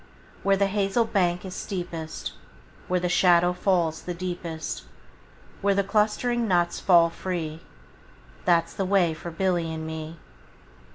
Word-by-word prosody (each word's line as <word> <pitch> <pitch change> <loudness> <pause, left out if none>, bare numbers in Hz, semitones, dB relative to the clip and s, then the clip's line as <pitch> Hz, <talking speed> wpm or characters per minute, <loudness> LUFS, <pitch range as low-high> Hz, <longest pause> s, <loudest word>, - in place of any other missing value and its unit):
Where 195 0 +3
the 200 - +3
hazel 200 +3 +1
bank 180 -4 0
is 185 - -6
steepest, 175 -5 -5 0.6
Where 180 0 +1
the 180 - -1
shadow 175 0 +4
falls 175 -4 +1
the 180 - -5
deepest, 170 - -5 0.8
Where 200 0 +2
the 200 - +2
clustering 220 +3 +1
nuts 175 -3 +1
fall 170 -3 +5
free, 165 -4 -4
15 - - -21 0.8
That 170 -2 +4
's - - -14
the 195 - -2
way 185 -4 +3
for 165 +2 -7
Billy 170 -1 0
and 160 0 -5
me. 160 +1 -6
180 Hz, 150 wpm, -26 LUFS, 165-195 Hz, 0.8 s, fall